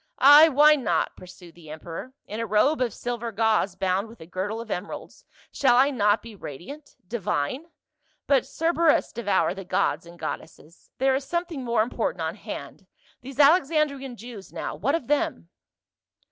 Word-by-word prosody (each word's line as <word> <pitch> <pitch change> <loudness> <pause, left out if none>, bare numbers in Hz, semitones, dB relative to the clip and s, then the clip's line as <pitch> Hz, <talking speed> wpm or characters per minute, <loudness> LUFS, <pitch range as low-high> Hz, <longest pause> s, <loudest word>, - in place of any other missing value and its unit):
"Ay, 290 +4 +8
why 300 +1 +6
not," 210 - -1
pursued 180 -1 -14
the 160 -2 -15
emperor, 165 +11 -8
"in 215 - -6
a 230 - -1
robe 215 +9 +2
of 245 -2 +1
silver 240 +1 -4
gauze 215 -3 +1
bound 190 +2 0
with 230 +1 -15
a - - -10
girdle 190 +6 -4
of 230 -2 -8
emeralds, 180 - -6 0.3
shall 250 -3 +3
I 275 +3 +5
not 210 -4 +2
be 230 -2 -11
radiant 195 - -10
— - - -41
divine? 210 - -2 0.6
But 275 -3 +2
Cerberus 330 -1 +2
devour 205 -6 0
the 195 0 -8
gods 170 -2 -1
and 170 0 -13
goddesses! 160 0 -8
there 265 +1 +2
is 270 +1 -1
something 340 -3 -3
more 235 -3 +2
im 235 - -6
portant - - -2
on - - -2
hand, - - -9 0.3
these 270 +1 -10
Alexandrian 285 -4 +3
Jews 225 -3 -10
now, - - -5
what 275 - 0
of 330 - -3
them 230 - -1
235 Hz, 175 wpm, -25 LUFS, 190-280 Hz, 0.6 s, Ay